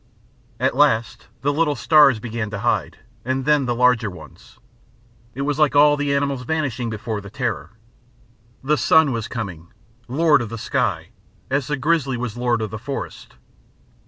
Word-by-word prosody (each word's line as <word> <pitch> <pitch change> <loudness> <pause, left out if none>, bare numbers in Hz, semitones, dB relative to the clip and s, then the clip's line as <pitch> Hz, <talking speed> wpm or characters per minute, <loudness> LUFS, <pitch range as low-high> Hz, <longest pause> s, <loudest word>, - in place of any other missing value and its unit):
At - - +1
last 115 +1 +1 0.2
the 145 +1 +1
little 150 -1 +1
stars 145 -2 +5
began 115 -1 -4
to 105 - -5
hide, - - 0 0.3
and 130 +1 -2
then 150 -3 +2
the 120 - 0
larger 125 -3 +3
ones. 90 - -14 0.8
It 140 - -3
was 145 +1 -1
like 150 -2 +3
all 145 +1 +6
the 145 -1 0
animals 140 -2 -1
vanishing 125 -4 -2
before 110 -1 -4
the 100 - -10
Terror. 115 -1 -4 0.9
The 150 +3 +2
Sun 160 -2 +4
was 115 -2 -3
coming, 95 -9 -6 0.4
lord 145 +2 +3
of 115 - -5
the 115 - -6
sky, - - -1 0.4
as 135 -1 0
the 145 - -1
grizzly 140 -3 0
was 120 -2 -4
lord 120 -2 0
of 105 - -5
the 110 - -6
forest. 135 +5 -7
125 Hz, 165 wpm, -21 LUFS, 115-145 Hz, 0.9 s, all